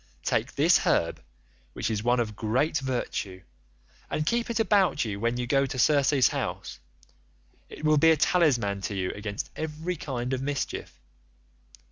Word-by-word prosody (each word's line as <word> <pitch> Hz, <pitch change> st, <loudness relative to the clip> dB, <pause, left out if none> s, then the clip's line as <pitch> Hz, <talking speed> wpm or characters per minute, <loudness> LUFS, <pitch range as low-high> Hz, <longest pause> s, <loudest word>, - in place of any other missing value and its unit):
Take -, -, -1 dB
this -, -, +5 dB
herb, -, -, 0 dB, 0.5 s
which 110 Hz, -, -2 dB
is 105 Hz, -2 st, -1 dB
one 120 Hz, +1 st, +2 dB
of 110 Hz, -3 st, -2 dB
great 130 Hz, +10 st, 0 dB
virtue, 120 Hz, -8 st, -4 dB, 0.7 s
and 155 Hz, -, -1 dB
keep 235 Hz, +6 st, 0 dB
it 235 Hz, -, -1 dB
about 195 Hz, -, +2 dB
you 100 Hz, -2 st, -4 dB
when 115 Hz, +2 st, 0 dB
you 125 Hz, -, -2 dB
go 135 Hz, +2 st, +2 dB
to 135 Hz, -1 st, -5 dB
Circe's 140 Hz, 0 st, +4 dB
house, -, -, -4 dB, 0.9 s
it 155 Hz, -, -8 dB
will 155 Hz, -1 st, +4 dB
be 165 Hz, -, +6 dB
a 160 Hz, -, +5 dB
talisman 130 Hz, -, +2 dB
to 100 Hz, -, -4 dB
you 95 Hz, -1 st, -1 dB
against 100 Hz, 0 st, -5 dB
every 160 Hz, +3 st, -4 dB
kind 130 Hz, -3 st, -4 dB
of 130 Hz, -, -2 dB
mischief. 140 Hz, 0 st, -4 dB
130 Hz, 160 wpm, -27 LUFS, 110-155 Hz, 0.9 s, be